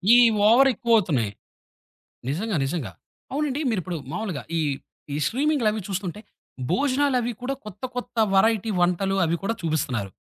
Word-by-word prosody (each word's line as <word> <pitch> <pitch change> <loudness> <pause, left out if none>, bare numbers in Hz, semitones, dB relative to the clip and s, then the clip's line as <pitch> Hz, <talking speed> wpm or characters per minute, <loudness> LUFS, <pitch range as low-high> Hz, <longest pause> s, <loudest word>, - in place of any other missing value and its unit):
ఈ - - +8 0.3
ఓవరెక్కువవుతున్నాయి. 225 - +3 1.0
నిజంగా. 190 +8 -1
నిజంగా. 135 - -3 0.4
అవునండి. 290 0 -1
మీరిప్పుడు 185 -5 -2 0.2
మామూలుగా 200 -9 -3 0.2
ఈ - - +2 0.5
ఈ - - -1
స్ట్రీమింగులవి 250 -5 +1
చూస్తుంటే, 190 0 -4 0.5
భోజనాలవి 255 +2 +1
కూడా 265 +2 -1
కొత్త 210 +3 -10
కొత్త 245 -1 -6 0.2
వేరైటీ 220 +2 +3
వంటలు 180 +2 +1
అవి 165 +1 +1
కూడా 200 +4 0
చూపిస్తున్నారు. 130 - -1
210 Hz, 115 wpm, -24 LUFS, 175-245 Hz, 1.0 s, ఈ